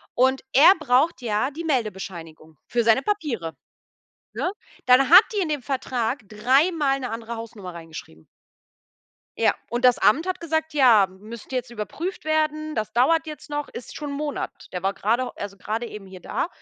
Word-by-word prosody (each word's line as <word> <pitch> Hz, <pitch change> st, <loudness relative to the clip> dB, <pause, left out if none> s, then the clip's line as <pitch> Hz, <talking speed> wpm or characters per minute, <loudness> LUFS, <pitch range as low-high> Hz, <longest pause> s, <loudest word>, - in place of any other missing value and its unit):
Und 260 Hz, +2 st, +3 dB
er 310 Hz, +8 st, +8 dB
braucht 280 Hz, +1 st, +2 dB
ja 225 Hz, +3 st, 0 dB
die 330 Hz, +4 st, -7 dB
Meldebescheinigung 185 Hz, -, -4 dB
für 240 Hz, -1 st, +1 dB
seine 225 Hz, +3 st, +4 dB
Papiere, 275 Hz, -, -2 dB, 0.8 s
ne? 360 Hz, -, -1 dB, 0.4 s
Dann 255 Hz, +3 st, +5 dB
hat 365 Hz, +3 st, +11 dB
die 400 Hz, -, +2 dB
in 335 Hz, -, -2 dB
dem 295 Hz, -3 st, -1 dB
Vertrag 260 Hz, -2 st, -2 dB
dreimal 275 Hz, +6 st, +2 dB
'ne 250 Hz, -3 st, -4 dB
andere 230 Hz, +1 st, -5 dB
Hausnummer 210 Hz, -6 st, -8 dB
reingeschrieben. 160 Hz, -, -11 dB, 1.1 s
Ja, -, -, +3 dB, 0.2 s
und 240 Hz, +2 st, 0 dB
das 250 Hz, -, +6 dB
Amt 315 Hz, -, +3 dB
hat 370 Hz, -, -2 dB
gesagt: 320 Hz, -1 st, -2 dB
„Ja, 245 Hz, -8 st, +6 dB
m 190 Hz, 0 st, -18 dB
müsste 235 Hz, +3 st, -8 dB
jetzt 250 Hz, -1 st, -2 dB
überprüft 300 Hz, -, -5 dB
werden, 310 Hz, 0 st, 0 dB
das 215 Hz, -1 st, -2 dB
dauert 320 Hz, +8 st, +3 dB
jetzt 300 Hz, -1 st, -9 dB
noch.“ 295 Hz, -1 st, -3 dB
Ist 240 Hz, -, -9 dB
schon 295 Hz, -2 st, -5 dB
'n -, -, -4 dB
Monat. 295 Hz, 0 st, -3 dB, 0.2 s
Der 180 Hz, 0 st, -4 dB
war 195 Hz, +1 st, +1 dB
grade 235 Hz, +6 st, 0 dB
also 200 Hz, -1 st, -6 dB
grade 220 Hz, +5 st, -3 dB
eben 210 Hz, -3 st, -9 dB
hier 190 Hz, -1 st, -11 dB
da 180 Hz, -, -3 dB
250 Hz, 175 wpm, -24 LUFS, 210-300 Hz, 1.1 s, hat